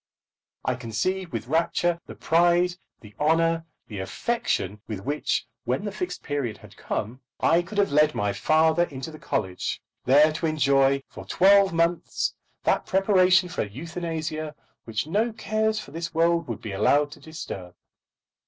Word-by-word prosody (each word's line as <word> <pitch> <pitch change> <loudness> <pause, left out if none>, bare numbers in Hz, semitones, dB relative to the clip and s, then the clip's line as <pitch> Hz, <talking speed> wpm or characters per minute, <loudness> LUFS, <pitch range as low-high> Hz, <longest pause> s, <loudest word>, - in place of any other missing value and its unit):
I - - +2
can 125 - -8
conceive 185 - -1
with 115 -2 -4
rapture 170 +3 +1
the - - -9
pride, 175 +2 +3 0.3
the 105 -2 -14
honour, 165 +2 +2 0.2
the 105 -3 -6
affection 105 - -2
with 105 -4 -5
which, 145 +7 -1 0.2
when 130 - -1
the 205 - -2
Fixed 180 -3 -5
Period 140 -7 -2
had - - -15
come, 120 +6 -4 0.2
I 170 +1 +4
could 190 +4 -9
have 200 -5 +3
led 150 +1 +4
my 105 -1 0
father 160 - +3
into 140 +1 -7
the 155 - -11
college, 95 -10 -2 0.3
there 150 +4 +6
to 160 - -1
enjoy 140 -3 +3
for - - -10
twelve 195 +1 +5
months 170 +1 0 0.3
that - - +1
preparation 190 -1 +4
for 180 - -3
euthanasia 155 - -4 0.3
which 110 -1 -2
no 210 +9 +1
cares 215 +1 0
for - - -10
this 165 0 -5
world 170 +1 +2
would 115 -4 -5
be 110 - -5
allowed 145 +9 +2
to 150 - -11
disturb. 140 - -8
160 Hz, 160 wpm, -25 LUFS, 135-175 Hz, 0.3 s, there